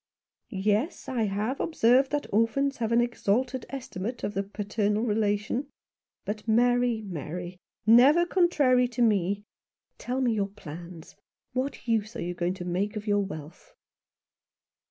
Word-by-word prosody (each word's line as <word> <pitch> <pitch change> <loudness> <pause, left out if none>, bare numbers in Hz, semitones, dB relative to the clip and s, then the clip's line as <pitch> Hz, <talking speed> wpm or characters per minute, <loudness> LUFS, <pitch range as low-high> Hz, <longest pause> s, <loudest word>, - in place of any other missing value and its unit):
"Yes, 210 - -1
I 240 -4 0
have 210 +6 -2
observed 265 -3 +3
that 290 0 -1
orphans 270 +6 +2
have 230 -1 -2
an 235 +1 +4
exalted 240 +2 -1
estimate 240 -3 -5
of 205 - -2
the 195 - 0
paternal 210 +1 -1
relation. 215 +4 0 0.6
But, 210 +2 -5
Mary, 240 0 +3
Mary 175 +1 -6 0.2
— - - -53 0.2
never 305 +7 +5
contrary 290 -9 +3
to 245 0 -1
me 200 -2 +1 0.3
— - - -57
tell 250 +1 -2
me 250 -3 +2
your 200 -2 -1
plans. 170 -3 -10 0.4
What 255 -2 -3
use 220 -1 0
are - - -3
you 175 +1 -3
going 175 +1 -1
to 180 -2 -7
make 190 +4 -1
of 210 0 -5
your 205 -1 +2
wealth 160 -3 -9
220 Hz, 150 wpm, -27 LUFS, 195-245 Hz, 0.6 s, never